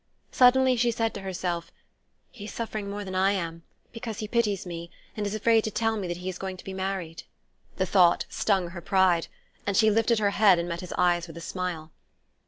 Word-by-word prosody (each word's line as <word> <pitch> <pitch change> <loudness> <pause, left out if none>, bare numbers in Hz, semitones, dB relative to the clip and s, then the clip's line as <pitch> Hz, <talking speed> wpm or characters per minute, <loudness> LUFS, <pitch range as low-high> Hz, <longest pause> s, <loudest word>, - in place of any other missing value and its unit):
Suddenly 255 0 +5
she 240 +1 +3
said 225 -1 -1
to 200 - -6
herself: 180 -2 -3 0.6
"He's 210 -3 -9
suffering 215 -3 -4
more 205 0 -5
than 190 - -6
I 190 +2 +3
am, 165 -3 -4 0.3
because 230 -2 -6
he 215 - -4
pities 210 -5 0
me, 170 -1 -6 0.3
and 210 -1 -2
is 200 - -3
afraid 225 +1 +3
to - - 0
tell 225 +1 0
me 200 -4 -3
that 175 0 -3
he 180 +1 -7
is 185 -1 -4
going 190 -1 -5
to - - -12
be 195 - -7
married." 190 -4 -4 0.5
The 185 - 0
thought 180 -2 +4
stung 190 -4 0
her 170 0 -8
pride, 185 -2 +2 0.4
and 200 -1 +1
she 220 -1 +5
lifted 225 +2 +2
her 205 -1 +2
head 200 -3 +5
and 170 0 -2
met 170 0 -4
his 180 - -6
eyes 175 -1 +2
with 165 0 -10
a - - -6
smile. 170 -2 -4
190 Hz, 215 wpm, -27 LUFS, 175-215 Hz, 0.6 s, Suddenly